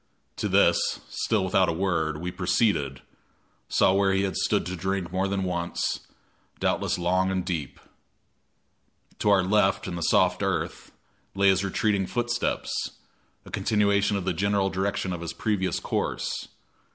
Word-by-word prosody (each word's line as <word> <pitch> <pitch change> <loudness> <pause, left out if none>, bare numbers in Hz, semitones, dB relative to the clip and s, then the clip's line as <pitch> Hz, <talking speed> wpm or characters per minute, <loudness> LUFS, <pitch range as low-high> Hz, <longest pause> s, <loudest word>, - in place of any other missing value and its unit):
To - - -1
this, - - +3
still 105 -4 0
without 95 0 +3
a - - 0
word, 80 -4 0
we 90 +3 -4
proceeded, 90 - 0 0.7
saw 95 - +4
where 100 0 +3
he 95 0 +2
had 95 - -2
stood - - +1
to 90 +2 -4
drink 95 0 -2
more 95 +1 0
than 95 0 -1
once, 85 -1 -2 0.5
doubtless - - 0
long 90 +2 +1
and 95 -2 -1
deep. 80 -7 -4 1.4
To 105 - +2
our 100 -2 +5
left, 95 +1 +2
in 90 - -4
the 85 - -5
soft 80 - +3
earth, - - -2 0.4
lay 100 0 +4
his 95 0 +3
retreating 100 0 0
footsteps 120 +1 -1 0.7
a - - -12
continuation 100 -1 +2
of 95 - -4
the 95 - +1
general 100 +2 +1
direction 95 -1 -1
of 85 - -5
his 85 - -4
previous 100 -4 -1
course. - - -2
95 Hz, 150 wpm, -26 LUFS, 90-100 Hz, 1.4 s, our